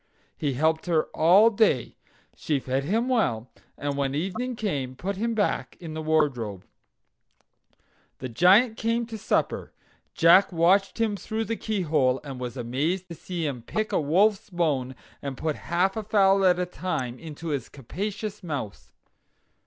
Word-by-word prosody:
He 145 -3 -2
helped 160 +5 +1
her 165 -3 +3
all 190 +8 +6
day. 200 - +1 0.4
She 150 -3 -1
fed 130 +1 -2
him 225 - 0
well, 130 - 0 0.3
and 145 0 -3
when 140 -1 -1
evening 195 - -2
came 140 - -3
put 195 +8 -4
him 230 +4 -1
back 205 -2 -1
in 165 -3 -7
the 160 - -4
wardrobe. 135 -11 0 1.5
The 130 - -5
Giant 195 - +4
came 230 +1 0
in - - -5
to 225 - -5
supper. - - -1 0.4
Jack 175 +4 +6
watched 185 +5 +2
him 220 -2 +1
through 220 +3 -3
the 230 - -2
keyhole, 155 - 0
and 135 -3 -7
was 125 0 -5
amazed 150 +10 -2
to - - -6
see 170 0 -5
him 135 -5 -3
pick 215 - -3
a - - +1
wolf's 195 +9 +2
bone, 145 -8 -1 0.3
and 140 -2 -5
put 155 -2 -2
half 180 +3 +1
a 220 - -2
fowl 195 -2 +3
at 180 -1 +5
a 180 - 0
time 130 -9 -4
into 160 0 -7
his 140 -5 -3
capacious 200 - -5
mouth. 145 - -6
170 Hz, 160 wpm, -26 LUFS, 140-200 Hz, 1.5 s, all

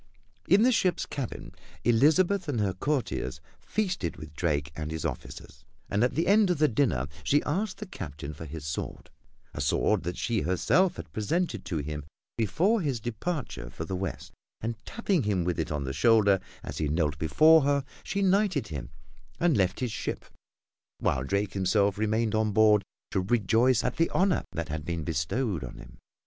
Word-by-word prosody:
In 200 +3 +5
the 255 - +5
ship's 185 -6 +1
cabin 135 -5 -5 0.3
Elizabeth 160 - +3
and 125 -6 0
her 100 -3 +1
courtiers 120 - -2 0.2
feasted 180 - -2
with 75 -1 -10
Drake 75 -2 -1
and 75 -1 -4
his 80 -1 -4
officers, 75 - -6 0.3
and 105 +3 +2
at 125 - +1
the 165 - +1
end 205 0 +5
of 180 - +2
the 150 +1 +4
dinner 115 - +1 0.2
she 145 - +3
asked 190 +7 -1
the 210 - -6
Captain 75 - -7
for 80 +3 -8
his 80 0 -7
sword 75 - -5 0.4
a - - -4
sword 75 - +2
that 85 +2 -4
she 115 -4 0
herself 170 - +2
had - - -9
presented 110 - -1
to 85 - -2
him 75 0 -4 0.3
before 180 - +2
his 140 -7 -1
departure 120 - -4
for - - -6
the 95 - -3
west, 95 -2 -5 0.3
and 115 0 -4
tapping 200 -6 0
him 100 -6 0
with 85 0 -1
it 80 - -2
on 75 -2 -1
the 65 0 -3
shoulder 100 - +4 0.2
as - - -6
he 75 - 0
knelt 75 -1 0
before 155 - +6
her, 140 0 +1 0.2
she 200 +1 -1
knighted 190 - +2
him, 70 -6 -5 0.5
and 170 -4 +3
left 95 +1 +1
his 125 -3 -1
ship, - - -4 0.7
while 65 - 0
Drake 100 +7 -1
himself 100 +1 +2
remained 110 +1 +1
on 110 -1 +1
board 105 -1 +5 0.3
to - - +1
rejoice 115 +4 +3
at 125 - -2
the 165 - +2
honor 190 -2 +2
that 85 -1 -4
had 75 0 -3
been 85 +1 -3
bestowed 85 - -1
on - - -8
him. - - -13
110 Hz, 185 wpm, -28 LUFS, -, 0.7 s, before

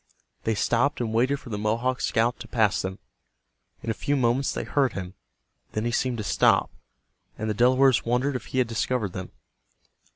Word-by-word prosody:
They 110 - +1
stopped 120 +7 +1
and 115 -3 -2
waited 130 +5 +2
for 125 - -11
the 105 - -3
Mohawk 115 +4 0
scout 115 +2 +1
to - - -9
pass 110 -4 +2
them. 95 0 -4 0.9
In 115 - -1
a - - 0
few 145 +6 -1
moments 130 +1 +1
they - - -3
heard 135 -5 +1
him. 90 -1 -6 0.6
Then 110 +1 -1
he 120 - 0
seemed 125 0 0
to 110 - -3
stop, - - +3 0.7
and 110 - -3
the 110 - 0
Delawares 130 +3 +4
wondered 125 +4 0
if 125 - -5
he - - -5
had 125 -2 +3
discovered 115 -3 -1
them. 95 -1 -6
120 Hz, 190 wpm, -26 LUFS, 110-130 Hz, 0.9 s, Delawares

